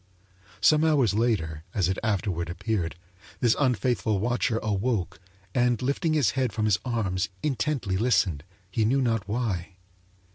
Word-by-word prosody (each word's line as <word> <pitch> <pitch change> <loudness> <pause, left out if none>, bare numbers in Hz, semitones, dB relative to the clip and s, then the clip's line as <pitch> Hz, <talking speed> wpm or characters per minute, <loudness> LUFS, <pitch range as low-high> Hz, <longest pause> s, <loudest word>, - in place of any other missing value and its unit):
Some 155 0 +5
hours 145 -9 +3
later, 95 -9 0
as 95 -4 +2
it 95 - -1
afterward 100 -6 -1
appeared, 90 -1 -2 0.4
this 120 -3 +3
unfaithful 120 -4 +1
watcher 120 +2 0
awoke 105 -4 -1 0.3
and 120 -2 +2
lifting 140 +5 0
his 140 -9 +3
head 130 -3 0
from 110 -1 0
his 105 -2 +3
arms 100 -7 -1
intently 135 -8 -1
listened 95 - +1 0.3
he 110 +4 +1
knew 125 +6 +2
not 115 -4 0
why. 100 -6 -2
110 Hz, 140 wpm, -26 LUFS, 95-125 Hz, 0.4 s, Some